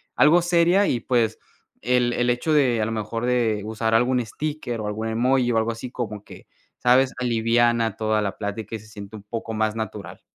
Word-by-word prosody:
algo 155 +7 +5
seria 175 +3 +3
y 120 - 0
pues 115 -2 0 0.4
el 125 +1 +2
el 120 0 0
hecho 125 +6 0
de 130 -6 +3
a - - +1
lo 115 - -3
mejor 115 +1 -3
de 120 -4 +1
usar 110 +1 -2
algún 125 +2 +2
sticker 145 -2 -4
o 105 - -4
algún 110 +2 -3
emoji 125 +2 +2
o - - +2
algo 110 +1 +1
así 115 +2 -7
como 105 -5 -5
que, - - -13 0.3
¿sabes? 130 +2 +3
Aliviana 115 -2 +1
toda 110 -1 0
la 100 -1 -3
plática 105 +1 -5
y - - -5
se 110 - -16
siente 105 -1 -10
un 100 - -13
poco 115 +1 -5
más 110 0 0
natural. 110 -3 -6
115 Hz, 205 wpm, -23 LUFS, 110-125 Hz, 0.4 s, algo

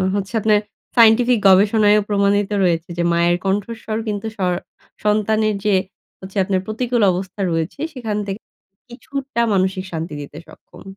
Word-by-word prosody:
হচ্ছে, 200 +1 -3
আপনার 210 0 +3 0.4
সায়েন্টিফিক 235 +1 +5
গবেষণায়ও 210 +2 +5
প্রমাণিত 200 0 +2
রয়েছে 170 -1 0
যে, 170 - 0
মায়ের 170 +1 +3
কণ্ঠস্বর 215 +3 -2
কিন্তু 210 0 -3
স - - -37 0.6
সন্তানের 215 0 +1
যে, 205 -2 +3 0.4
হচ্ছে, 190 +1 -9
আপনার 190 -1 0
প্রতিকূল 240 +2 -1
অবস্থা 190 +2 -5
রয়েছে 165 - -2
সেখান 220 -5 -4
থেকে 195 +2 -5 0.5
কিছুটা 270 0 -4
মানসিক 190 -1 0
শান্তি 165 -1 -5
দিতে 145 +1 -10
সক্ষম। - - -16
205 Hz, 135 wpm, -19 LUFS, 190-220 Hz, 0.6 s, সায়েন্টিফিক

